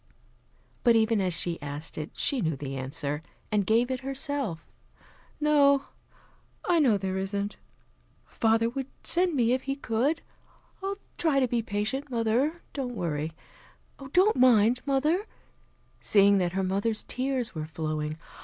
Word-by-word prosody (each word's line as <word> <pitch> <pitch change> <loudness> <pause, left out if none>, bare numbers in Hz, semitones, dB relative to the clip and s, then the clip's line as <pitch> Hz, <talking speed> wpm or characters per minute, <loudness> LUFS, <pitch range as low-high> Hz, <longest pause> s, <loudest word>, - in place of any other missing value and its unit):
But 235 -2 +5
even 220 -1 +3
as 185 -1 0
she 170 -2 -1
asked 145 +2 -6
it, 155 0 -5
she 270 -4 0
knew 160 -5 0
the 135 0 -6
answer, 140 +3 -3 0.3
and 205 -2 +1
gave 235 +3 +3
it 260 - -2
herself. 270 - -2 0.7
"No, 285 -2 +4 0.8
I 345 -2 +3
know 245 -9 +4
there 190 -1 -2
isn't. 200 +1 -3 0.7
Father 225 0 +1
would 265 +2 -4 0.2
send 350 -1 +4
me 240 -3 +2
if 255 +1 +1
he 275 - +1
could. 275 +4 -1 0.6
I'll 395 +1 -3 0.2
try 310 -5 +3
to 260 - +2
be 235 -1 0
patient, 220 +7 -2
mother. 245 +7 0
Don't 255 -4 -4
worry. 160 -4 -2 0.8
Don't 380 +3 +4
mind, 245 -1 +5
mother 305 +9 +1 0.4
" - - -37 0.3
seeing 200 -1 +5
that 175 -1 0
her 190 0 0
mother's 200 +4 0
tears 255 -2 -2
were 155 -2 -5
flowing. 155 -1 -3
230 Hz, 145 wpm, -28 LUFS, 190-275 Hz, 0.8 s, But